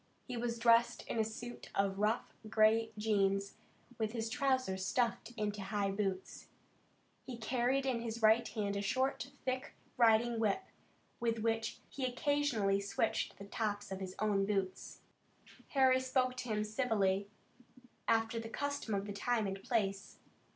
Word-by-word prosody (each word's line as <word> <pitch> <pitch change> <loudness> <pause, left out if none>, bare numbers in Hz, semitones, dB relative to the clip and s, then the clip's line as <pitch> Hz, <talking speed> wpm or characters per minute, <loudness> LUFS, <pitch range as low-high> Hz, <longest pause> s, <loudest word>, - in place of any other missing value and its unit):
He 250 - -5
was 235 0 -2
dressed 235 0 +4
in 230 - -2
a - - +4
suit 235 +2 -7
of 195 0 +1
rough 215 +3 0 0.2
gray 220 +1 +4
jeans, 200 -2 +1 0.5
with 220 0 -1
his 225 -1 -2
trousers 260 -9 +1
stuffed 235 +3 0
into 210 -1 -2
high 200 0 -1
boots. 195 -2 -3 0.7
He 250 -3 -7
carried 250 +4 +1
in 250 -3 0
his 230 -1 -5
right 220 +2 +5
hand 205 -3 -2
a 200 - -1
short, 260 +6 0 0.2
thick 260 +2 -2 0.2
riding 230 0 +4
whip, 220 - +1 0.6
with 230 -1 0
which 225 0 0
he 275 - -6
occasionally 250 -6 +1
switched 200 +2 -1
the 200 - -9
tops 205 -1 -3
of 190 - -3
his 185 -1 -6
own 205 -2 +2
boots. 195 -2 -2 0.7
Harry 260 -2 +4
spoke 255 -1 +1
to 250 -1 -5
him 210 -1 +1
civilly, 210 -4 +1 0.8
after 225 0 +2
the 225 0 -6
custom 285 -4 -2
of 195 0 -1
the 205 - -5
time 225 +2 0
and 195 0 -3
place. 195 -4 -1
225 Hz, 150 wpm, -35 LUFS, 200-245 Hz, 0.8 s, right